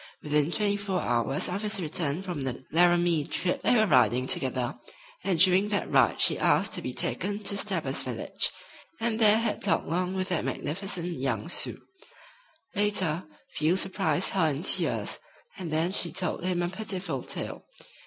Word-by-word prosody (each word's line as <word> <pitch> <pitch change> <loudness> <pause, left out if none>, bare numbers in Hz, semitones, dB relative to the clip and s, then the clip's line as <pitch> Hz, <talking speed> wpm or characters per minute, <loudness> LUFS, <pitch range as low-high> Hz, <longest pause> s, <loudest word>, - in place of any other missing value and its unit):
Within 150 +1 +1
twenty 205 +1 0
four 200 -2 -2
hours 120 +1 0
of 190 +3 -3
his 210 -1 +1
return 160 0 -1
from 175 -6 -4
the 130 -1 -4
Laramie 175 -1 +3
trip 180 +5 -2
they - - +3
were 220 -2 +4
riding 125 - +3
together, 130 -1 -1 0.5
and 190 -3 0
during 185 +4 +5
that 205 - -1
ride - - +3
she - - +3
asked - - +2
to - - +1
be - - -4
taken 205 0 0
to 200 - 0
Stabber's 200 - -1
village, - - -2 0.5
and 225 -1 -1
there 215 -1 +7
had 225 -2 -1
talked 175 -5 +1
long 180 +3 -1
with 185 0 -2
that 175 -3 0
magnificent 175 0 -3
young 125 -2 -2
Sioux. - - 0 0.9
Later, 195 -6 0 0.3
Field 160 +5 +1
surprised 190 -1 +1
her 185 -5 +2
in 145 +2 -3
tears, - - +1 0.4
and 175 -4 -5
then 160 +3 +1
she 175 -3 +1
told 185 -2 -2
him 180 -1 0
a 175 - -1
pitiful 185 -7 -3
tale. - - -4
180 Hz, 170 wpm, -27 LUFS, 150-195 Hz, 0.9 s, there